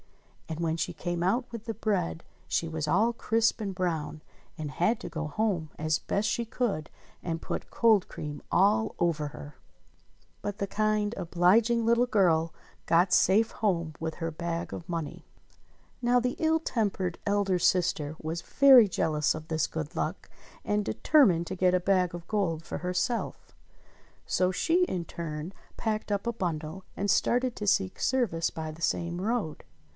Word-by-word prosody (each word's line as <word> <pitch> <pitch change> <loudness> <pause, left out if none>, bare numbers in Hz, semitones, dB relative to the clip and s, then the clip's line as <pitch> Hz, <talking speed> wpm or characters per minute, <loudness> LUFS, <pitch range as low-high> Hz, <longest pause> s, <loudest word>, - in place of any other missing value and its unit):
And 160 0 -4
when 165 -1 0
she 165 - -2
came 175 -1 -3
out 235 +8 +1
with 230 -3 -7
the 225 - -4
bread 190 -6 -1 0.2
she 165 - 0
was 160 -2 -3
all 215 +9 +3
crisp 225 0 +1
and 200 -2 -3
brown 165 -4 -2 0.4
and 155 -2 -4
had 210 +9 +1
to - - -6
go 160 -2 -4
home 175 -1 -1
as 155 0 0
best 205 +2 -1
she 235 - 0
could 220 -9 -2 0.3
and 165 -2 -3
put - - -5
cold 220 -5 +3
cream 150 -1 -6
all 210 +4 +3
over 160 -3 +1
her! 145 0 -10 0.9
But 205 -1 -4
the 200 - -2
kind, 215 +1 0
obliging 215 +7 +3
little 235 +2 +3
girl 170 -7 +3 0.4
got 175 +2 +4
safe 215 +4 +4
home 170 -7 -1
with 160 -1 -3
her 165 -1 -3
bag 170 +1 -4
of 170 - -8
money. 165 -4 -4 0.8
Now 245 0 +4
the 250 +1 -1
ill 320 0 +3
tempered 200 - -1
elder 200 -2 +1
sister 165 -4 +1
was 160 +2 -3
very 260 - +7
jealous 155 -3 +1
of 155 0 -8
this 160 -2 0
good 160 -1 -5
luck, - - -3 0.4
and 210 0 +1
determined 195 - +3
to - - -4
get 185 0 +3
a - - +3
bag 180 -1 +2
of 170 -1 -8
gold 175 -7 -1
for - - -5
herself. 180 +6 -2 0.7
So 185 0 +1
she 335 - +2
in 180 - -3
her - - -15
turn 165 +1 -6 0.2
packed 215 -2 -2
up 200 -1 -1
a 235 - 0
bundle 170 -2 -4
and 200 +1 -1
started 250 +3 +2
to 210 - -4
seek 190 -1 +1
service 220 -11 +1
by 160 -1 -5
the 160 +2 -13
same 170 +1 -1
road. 210 -7 -2
180 Hz, 170 wpm, -28 LUFS, 165-215 Hz, 0.9 s, very